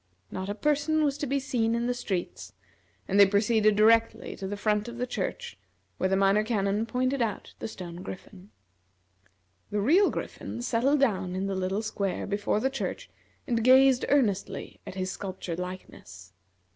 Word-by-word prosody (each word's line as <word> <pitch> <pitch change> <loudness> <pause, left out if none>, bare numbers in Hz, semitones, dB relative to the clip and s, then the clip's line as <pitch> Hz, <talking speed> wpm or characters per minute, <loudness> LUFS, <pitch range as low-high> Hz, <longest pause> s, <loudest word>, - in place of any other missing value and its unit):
Not 190 +1 -4
a 205 - -2
person 300 +5 +1
was 285 -2 +1
to 290 - -2
be 280 +2 0
seen 235 -4 0
in 235 0 -1
the 245 - +1
streets, 195 -8 -4 0.5
and 200 +1 +2
they 200 - +10
proceeded 215 +1 +3
directly 225 +2 +3
to 195 - -5
the 205 +1 -4
front 210 +1 0
of 235 0 -7
the 250 - -1
church, 250 - -4 0.4
where 185 - +1
the 190 - +2
Minor 195 +2 +3
Canon 210 -1 0
pointed 255 +2 0
out 215 -4 -3
the - - -4
stone 175 -5 -8
griffin. 185 +1 -10 1.2
The 210 - -1
real 335 - +4
Griffin 240 - -6
settled 255 +5 +2
down 190 -8 +1
in 190 +1 -2
the 195 - -2
little 190 +3 -1
square 200 -3 -2
before 205 +1 0
the 265 +4 0
church - - -5 0.3
and 230 -2 0
gazed 260 +1 +6
earnestly 220 -9 0
at - - -7
his 185 -1 -2
sculptured 185 -4 -5
likeness. 100 - -9
215 Hz, 170 wpm, -28 LUFS, 195-250 Hz, 1.2 s, they